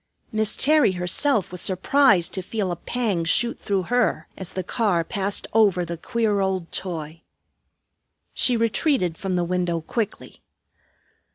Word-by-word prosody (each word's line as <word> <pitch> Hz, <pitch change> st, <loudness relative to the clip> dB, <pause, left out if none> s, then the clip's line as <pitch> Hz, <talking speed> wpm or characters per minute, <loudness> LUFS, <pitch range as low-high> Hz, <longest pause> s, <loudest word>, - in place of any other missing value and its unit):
Miss 215 Hz, 0 st, 0 dB
Terry 295 Hz, -8 st, +3 dB
herself 185 Hz, -, +1 dB
was 180 Hz, -, -5 dB
surprised 195 Hz, 0 st, +3 dB
to 190 Hz, -, -2 dB
feel 195 Hz, 0 st, -3 dB
a -, -, -2 dB
pang 205 Hz, -1 st, -2 dB
shoot 235 Hz, +8 st, +1 dB
through 195 Hz, -2 st, -1 dB
her 245 Hz, +5 st, 0 dB
as 190 Hz, -2 st, -7 dB
the 185 Hz, -, -3 dB
car 185 Hz, -4 st, 0 dB
passed 200 Hz, +2 st, -1 dB
over 200 Hz, -5 st, +3 dB
the 170 Hz, +1 st, -5 dB
queer 220 Hz, +3 st, -1 dB
old 190 Hz, -3 st, -2 dB
toy. 165 Hz, -3 st, -5 dB, 1.1 s
She 245 Hz, -2 st, +3 dB
retreated 230 Hz, -, +1 dB
from 190 Hz, +1 st, -3 dB
the 175 Hz, -, +1 dB
window 175 Hz, -1 st, -1 dB
quickly. 215 Hz, +5 st, -5 dB
190 Hz, 145 wpm, -23 LUFS, 175-225 Hz, 1.1 s, Terry